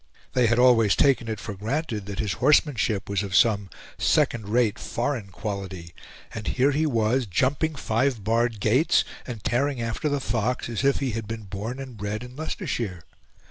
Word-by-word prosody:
They 125 -2 +3
had 115 +1 +2
always 120 -4 +5
taken 135 -4 +3
it 110 -2 -3
for 105 - -6
granted 110 - -3
that 100 -1 -5
his 105 -3 -1
horsemanship 125 -7 +3
was 100 -1 0
of 100 -2 -3
some 100 -3 +3 0.3
second 110 -4 +2
rate 115 -1 +2
foreign 120 -4 -2
quality, 95 -3 -6 0.4
and 110 -2 -6
here 135 +2 +2
he 155 +3 +1
was 120 -1 +1
jumping 135 - +1
five 115 -2 0
barred 115 +1 +1
gates 120 - +3 0.2
and 115 -5 -6
tearing 135 +4 0
after 115 +6 -2
the 145 -1 0
fox 120 0 -1
as 115 +2 -2
if 140 +1 +2
he 135 -2 0
had 110 -1 -4
been 115 0 -5
born 105 +6 -5
and 130 -4 -8
bred 105 +2 -4
in 125 0 -10
Leicestershire. 115 - -4
115 Hz, 180 wpm, -25 LUFS, 105-130 Hz, 0.4 s, always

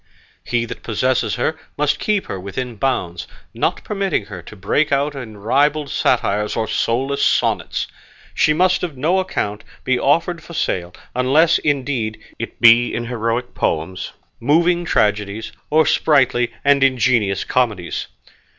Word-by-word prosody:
He 120 -1 -1
that 120 - -8
possesses 125 +3 0
her 140 +6 0 0.2
must 150 0 +1
keep 210 -2 0
her 95 - -5
within 115 +6 -5
bounds, 90 -9 -2 0.3
not - - -1
permitting 195 - -1
her 95 -4 -8
to 95 - -12
break 105 +11 0
out 140 +1 +1
in 115 -6 -8
ribald 140 +7 +1
satires 105 -4 +1
or 110 -1 -1
soulless 135 +4 0
sonnets. - - +1 0.5
She - - +3
must 180 +4 +2
on 155 -7 -4
no 170 +7 +2
account 105 - -3 0.2
be 130 -1 +1
offered 165 +4 +1
for 170 +1 -11
sale, 90 - -1 0.2
unless, 150 +7 +3
indeed, 130 -7 -1 0.2
it - - -6
be 120 +1 +6
in 120 - -3
heroic 115 +1 -2
poems, 85 +4 -2 0.3
moving 170 +6 +2
tragedies, 105 -3 0 0.2
or 155 +1 +4
sprightly 125 -5 +2
and 140 -1 +4
ingenious 120 -6 +2
comedies. 110 -9 -1
125 Hz, 140 wpm, -19 LUFS, 110-150 Hz, 0.5 s, be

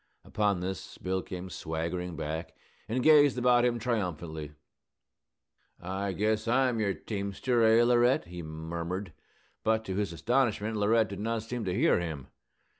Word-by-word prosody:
Upon 100 -4 0
this 95 -2 -5
Bill 95 0 -2
came 90 0 -7
swaggering 85 +2 -3
back, 80 +1 -5 0.3
and 125 +3 0
gazed 145 -4 +6
about 125 -1 +4
him 120 -1 +2
triumphantly. 85 -10 -3 1.3
"I 95 +2 -3
guess 110 +3 0
I'm 125 -1 +2
your 100 -3 0
teamster, 105 +4 -1
eh, 115 +1 +6
Laurette?" 120 +1 +3
he 90 0 -8
murmured. 85 +3 -5 0.5
But, 110 0 +1
to 95 - -3
his 100 -4 -1
astonishment, 110 - 0
Laurette 110 +1 +3
did 100 - -6
not 115 +1 -2
seem 115 0 -4
to 90 -1 -1
hear - - +3
him. 80 -6 -5
100 Hz, 145 wpm, -29 LUFS, 90-115 Hz, 1.3 s, gazed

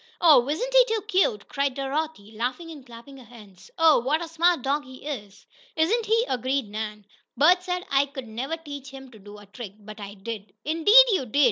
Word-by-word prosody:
"Oh, 290 -6 +5
isn't - - -2
he - - +8
too 450 -2 -1
cute!" 370 - 0
cried 280 -2 -1
Dorothy, 275 -5 -4
laughing 255 +9 -4
and 295 -4 -11
clapping 245 +3 -13
her 260 - -13
hands. 215 - -16
"Oh, 325 -4 +5
what 275 +6 0
a 340 - -5
smart 330 -2 +1
dog 285 +2 0
he 260 +1 -13
is!" 210 -9 -7 0.3
"Isn't 425 +8 +1
he!" 455 +2 +2
agreed 255 -1 -1
Nan. 210 -1 -6 0.3
"Bert 355 +5 +5
said 360 0 -4
I 275 0 +2
never 245 +8 -5
could 325 - -25
teach 285 -2 -8
him 270 -1 -12
to 220 - -15
do 205 +1 -13
a 205 - -14
trick, 200 0 -10
but 215 0 -12
I 200 0 -8
did." 210 0 -8
"Indeed 370 +11 +6
you 320 -11 0
did!" 255 +6 -1
275 Hz, 210 wpm, -25 LUFS, 220-325 Hz, 0.3 s, he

